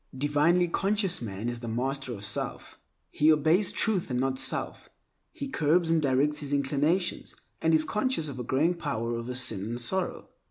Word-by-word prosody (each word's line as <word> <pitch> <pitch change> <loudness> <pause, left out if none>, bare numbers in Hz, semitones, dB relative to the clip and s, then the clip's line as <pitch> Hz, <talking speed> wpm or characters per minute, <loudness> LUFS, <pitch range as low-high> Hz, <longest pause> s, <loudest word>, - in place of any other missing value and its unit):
Divinely 150 +6 +3
conscious 195 0 0
man 105 0 -5
is 120 0 -3
the 120 - -7
master 130 +3 -2
of 100 -3 -6
self. - - -4 0.3
He 155 +2 +4
obeys 160 +6 +3
Truth 205 -8 0
and 125 -1 -1
not 130 0 0
self. - - -2 0.4
He 280 - -6
curbs 165 - +2
and 165 -1 +3
directs 140 +2 +1
his 145 -1 -5
inclinations 145 +6 0 0.3
and 160 - +2
is 155 -1 +4
conscious 215 - 0
of 135 -3 -6
a - - -3
growing 145 +8 +1
power 130 -9 -3
over 120 +2 -4
sin 115 -6 +3
and 120 +3 -4
sorrow. 185 +10 -2
145 Hz, 175 wpm, -28 LUFS, 125-170 Hz, 0.4 s, He